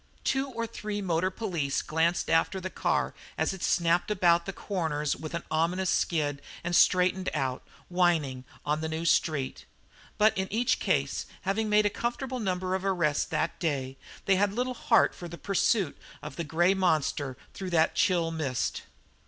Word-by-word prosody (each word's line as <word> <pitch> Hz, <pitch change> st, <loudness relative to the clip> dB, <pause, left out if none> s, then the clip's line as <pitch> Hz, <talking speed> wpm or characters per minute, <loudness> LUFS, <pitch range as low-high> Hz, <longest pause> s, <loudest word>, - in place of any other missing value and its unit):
Two 270 Hz, +1 st, 0 dB
or 230 Hz, -2 st, -3 dB
three 210 Hz, -2 st, -5 dB
motor 180 Hz, -2 st, +1 dB
police 180 Hz, -9 st, -2 dB
glanced 165 Hz, +2 st, +1 dB
after 165 Hz, +4 st, +2 dB
the 185 Hz, 0 st, -5 dB
car -, -, 0 dB, 0.2 s
as -, -, +1 dB
it 190 Hz, -, -9 dB
snapped 170 Hz, +1 st, +2 dB
about 175 Hz, -4 st, +3 dB
corners 160 Hz, -7 st, -1 dB
with 155 Hz, +1 st, -6 dB
an 170 Hz, -, -3 dB
ominous 170 Hz, +4 st, +1 dB
skid 145 Hz, -4 st, 0 dB, 0.2 s
and 175 Hz, 0 st, -1 dB
straightened 185 Hz, +2 st, +4 dB
out, 130 Hz, -3 st, -1 dB, 0.3 s
whining, 165 Hz, -8 st, +1 dB, 0.2 s
on 150 Hz, +1 st, 0 dB
the 160 Hz, -, -2 dB
new 160 Hz, +1 st, -3 dB
street; 150 Hz, -5 st, +1 dB, 0.5 s
but 215 Hz, +1 st, +4 dB
in 190 Hz, 0 st, -2 dB
each 245 Hz, +4 st, +1 dB
case, 140 Hz, -8 st, 0 dB, 0.2 s
having 215 Hz, +3 st, 0 dB
made 210 Hz, 0 st, +4 dB
a -, -, +4 dB
comfortable 250 Hz, +3 st, -3 dB
number 185 Hz, -3 st, -1 dB
of 190 Hz, 0 st, -1 dB
arrests 170 Hz, -7 st, +1 dB
that 165 Hz, -, -2 dB
day, 135 Hz, -5 st, -2 dB, 0.3 s
they 195 Hz, -1 st, +4 dB
had 200 Hz, 0 st, +2 dB
little 250 Hz, +3 st, -1 dB
heart 230 Hz, -3 st, +3 dB
for 175 Hz, -, -8 dB
the 170 Hz, 0 st, -8 dB
pursuit 195 Hz, -2 st, +1 dB, 0.3 s
of 150 Hz, -2 st, -7 dB
the 170 Hz, -, -3 dB
grey 175 Hz, +4 st, +3 dB
monster 155 Hz, -7 st, 0 dB, 0.2 s
through 190 Hz, -1 st, -5 dB
that 165 Hz, -2 st, +3 dB
chill 170 Hz, -4 st, +2 dB
mist. 145 Hz, -6 st, -2 dB
175 Hz, 170 wpm, -28 LUFS, 155-195 Hz, 0.5 s, straightened